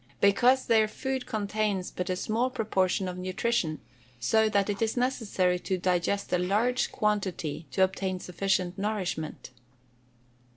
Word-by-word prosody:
_ - - -36
Because 245 +6 +4
their 220 -2 +4
food 265 +3 -4
contains 210 -3 -1
but 180 +1 -4
a 185 - +1
small 225 +7 0
proportion 190 -5 0
of 180 0 -5
nutrition, 185 -3 -1 0.4
so 220 - +3
that 200 -2 +2
it 205 0 -3
is 225 +2 0
necessary 205 -8 +1
to 190 +1 -2
digest 180 +2 0
a 180 - +3
large 215 +8 +1
quantity 190 -7 -1
to 160 +9 +2
obtain 190 0 -1
sufficient 185 +1 -1
nourishment. 190 -10 -3
195 Hz, 140 wpm, -28 LUFS, 180-220 Hz, 0.4 s, Because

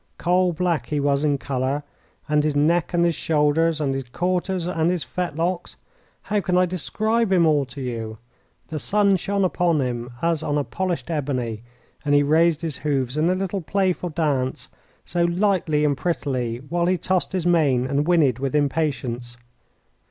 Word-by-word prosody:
Coal 180 +1 +2
black 170 -1 -1
he 150 - -1
was 140 0 +1
in 145 -2 +2
colour, 135 +1 -2 0.4
and 150 0 +2
his 150 -1 0
neck, 160 +3 +2
and 170 -1 +2
his 170 - +2
shoulder, 155 +1 +2
and 140 -3 0
his 135 -2 -5
quarters, 180 +3 -1
and 165 -2 0
his 180 -4 -1
fetlocks 175 +5 -3 0.5
how 210 -1 0
can 180 -1 +1
I 180 - +5
describe 215 +5 0
him 175 -3 +4
all 150 -3 +3
to 135 +2 -9
you? 115 -3 -4 0.5
The 155 - -3
sun 200 +5 +3
shone 200 +2 -1
upon 175 -3 +1
him 120 -2 -2
as 165 0 0
on 145 -2 -1
polished 180 -2 -3
ebony, 130 -7 -2 0.4
and 145 -1 +2
he 145 - +5
raised 160 +2 +3
his 155 -5 -2
hoofs 135 -3 -1
in 155 +3 +2
a 185 - +2
little 195 +1 -2
playful 185 0 0
dance 145 -5 -1 0.4
so 175 - 0
lightly 170 -4 +1
and 145 -1 +2
prettily, 130 -8 -2
while 170 +2 0
he 185 0 +2
tossed 185 +1 -1
his 185 -3 -1
mane 145 -8 +3
and 140 +3 0
whinnied 150 -9 +3
with 135 +1 -2
impatience. 135 -5 -1
155 Hz, 175 wpm, -23 LUFS, 140-180 Hz, 0.5 s, I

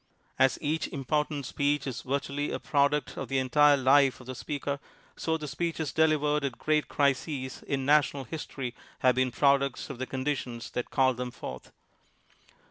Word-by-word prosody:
As 135 0 +4
each 155 +2 0
important 145 +1 -1
speech 145 +2 0
is 130 -2 -4
vir 140 +2 0
tually 145 +1 -3
a - - -1
product 145 0 +1
of - - -4
the 135 - 0
entire 145 +3 +5
life 135 0 +4
of 125 - -13
the 130 - -5
speaker, 140 +1 -4 0.4
so 160 0 -1
the 155 -1 -6
speeches 165 0 -2
delivered 150 -2 +2
at 135 -4 -2
great 155 -1 +1
crises 140 -2 -1
in 135 -1 -1
na 150 +2 +7
tional 140 -1 -5
history 135 -3 -5 0.3
have 130 -1 +5
been 130 +1 +1
products 140 +2 +2
of 130 - -9
the 130 - -3
condi 135 +2 -1
tions 120 -3 -7
that 125 - -3
called 130 -2 +2
them 125 0 -3
forth. 65 - -8
140 Hz, 180 wpm, -29 LUFS, 130-150 Hz, 0.4 s, na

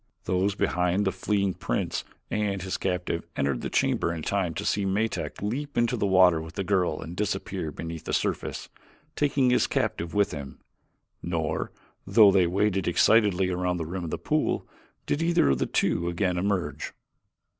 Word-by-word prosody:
Those 95 +2 0
behind 90 +1 +1
the 95 - +2
fleeing 100 0 0
prince - - -2 0.3
and 105 -2 0
his 95 - -2
captive 90 -2 -2
entered 70 -3 0
the - - -3
chamber - - +1
in 80 -2 -5
time 90 -4 -1
to - - -4
see 100 - +1
Metak 100 +2 -2
leap 140 +8 -3
into 120 +1 +2
the 105 -3 0
water 90 -4 +5
with 80 +1 -10
the 100 - -1
girl 95 -2 +1
and 85 - -7
disappear 95 -4 -2
beneath 80 +2 -7
the - - -3
surface - - -2 0.5
taking 140 -3 +2
his - - +3
captive 85 0 -2
with 100 -1 +3
him, 70 -2 -7 0.6
nor, 85 -2 -2 0.4
though 105 -3 +7
they 95 -3 +4
waited 95 +1 +1
excitedly 95 0 +4
around 90 0 -1
the 80 - -3
rim 90 +3 -4
of 85 - -4
the - - -2
pool, - - 0 0.4
did 145 - -1
either 165 - +3
of 65 - +1
the - - 0
two 85 +1 +1
again 90 +1 0
emerge. 95 0 -2
95 Hz, 175 wpm, -27 LUFS, 85-100 Hz, 0.6 s, though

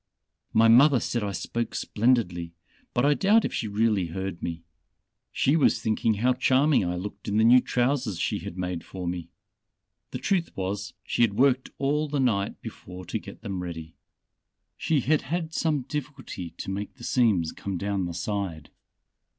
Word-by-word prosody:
My 115 +1 +5
mother 130 +4 +7
said 120 +1 -2
I 100 - -2
spoke 115 +4 -3
splendidly, 95 -8 0 0.4
but 120 - +1
I 145 - +5
doubt 205 +7 +4
if - - -3
she 110 - -2
really 105 -3 +1
heard 95 +1 -5
me. 85 -1 -4 0.7
She 140 - +2
was 160 - +3
thinking 110 0 +1
how 125 +5 +2
charming 130 +1 +3
I 90 0 -1
looked 100 +2 -7
in 105 0 0
the 110 - +4
new 125 +2 +7
trousers 125 -6 0
she - - -1
had 85 - -8
made 90 -2 -3
for 90 -2 -7
me. 85 -1 -4 0.8
The - - -4
truth 175 +6 -1
was, 100 +1 -3
she - - -2
had 110 -4 +3
worked 130 +1 +3
all 145 +3 0
the 145 -1 -2
night 105 -7 0
before 90 0 -9
to - - -3
get - - -12
them 95 -2 -4
ready. 80 -2 -7 0.8
She 155 -4 +1
had 150 +5 +2
had 165 +2 -3
some 150 -5 0
difficulty 135 - -6
to - - -5
make 100 +1 -5
the - - -14
seams 105 -10 +2
come 100 -2 -5
down 100 0 -1
the 85 -1 -5
side. 90 -4 -4
110 Hz, 175 wpm, -26 LUFS, 95-130 Hz, 0.8 s, mother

